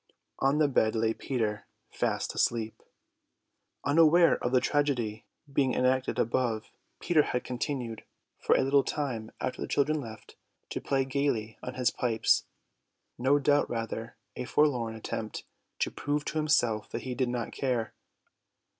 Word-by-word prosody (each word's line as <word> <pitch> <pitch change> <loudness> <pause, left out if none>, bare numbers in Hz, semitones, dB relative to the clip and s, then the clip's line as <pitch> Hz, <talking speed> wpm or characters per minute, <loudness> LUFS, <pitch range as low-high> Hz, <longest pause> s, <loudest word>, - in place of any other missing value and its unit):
On 135 +2 +3
the 150 -1 +4
bed 110 -5 +2
lay 110 0 +2
Peter 110 -7 -2 0.2
fast - - -1
asleep. 115 -2 0 1.0
Unaware 165 +3 +5
of 120 - 0
the 130 - +5
tragedy 125 -8 0 0.3
being 135 -2 +2
enacted 130 +1 +1
above, 115 -2 0 0.3
Peter 170 -3 +3
had 125 -3 -2
continued, 125 -3 -4 0.4
for - - +3
a - - +3
little 135 +1 +4
time 125 -7 -3
after 130 - -3
the - - -2
children 150 +2 +1
left, 110 -4 -11 0.3
to - - -3
play 135 -1 +1
gaily 130 -5 -1
on 125 - -6
his 125 -1 +2
pipes: 115 -3 +2 0.7
no 135 +4 +4
doubt 145 +1 +2
rather 115 -1 -4 0.2
a - - -4
forlorn 125 -6 +1
attempt 110 0 -5 0.3
to - - 0
prove 145 0 -2
to 155 - -1
himself 120 -9 +2
that - - -5
he 130 - -3
did 125 0 0
not 120 -2 -3
care. 125 -5 -1
125 Hz, 145 wpm, -29 LUFS, 115-145 Hz, 1.0 s, Unaware